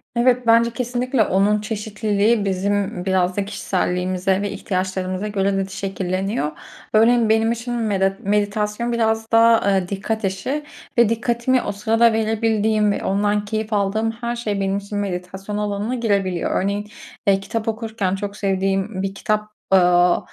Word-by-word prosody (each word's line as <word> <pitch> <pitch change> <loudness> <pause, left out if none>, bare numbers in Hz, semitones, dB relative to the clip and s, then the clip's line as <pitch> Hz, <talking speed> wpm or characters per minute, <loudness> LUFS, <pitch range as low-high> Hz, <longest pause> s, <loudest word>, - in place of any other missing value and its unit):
Evet, 245 0 +2
bence 230 +1 +5
kesinlikle 245 +1 0
onun 205 +2 +2
çeşitliliği 210 0 0
bizim 195 -1 -1
biraz 185 -1 +1
da 200 - 0
kişiselliğimize 185 -1 -1
ve 205 - -2
ihtiyaçlarımıza 185 0 -2
göre 200 -1 0
de 195 - 0
şekilleniyor. 190 -2 -2 0.4
Örneğin, 225 +1 +4
benim 225 +1 +3
için 235 +1 -4
medet 195 -4 0
meditasyon 210 +3 -1
biraz 225 -1 0
daha, 230 -2 +5
eee, 190 -2 +1
dikkat 215 +3 -3
işi 195 +11 -2 0.3
ve 235 -2 +5
dikkatimi 235 +2 +1
o - - -3
sırada 225 +3 +3
verebildiğim 220 -1 +1
ve - - -3
ondan 205 +1 +1
keyif 215 +1 -3
aldığım 210 +2 +1
her 235 +1 -4
şey 215 -4 -2
benim 195 0 0
için 200 +1 -5
meditasyon 190 +1 -4
alanına 210 +3 -2
girebiliyor. 200 -7 0
Örneğin, 205 +1 -2 0.4
eee, 195 -1 +4
kitap 220 +3 -4
okurken 220 -4 -2
çok 200 +1 -5
sevdiğim 195 0 -1
bir 195 0 -3
kitap, 210 +1 -1 0.2
aaa, 180 -1 +5
205 Hz, 145 wpm, -21 LUFS, 195-225 Hz, 0.4 s, bence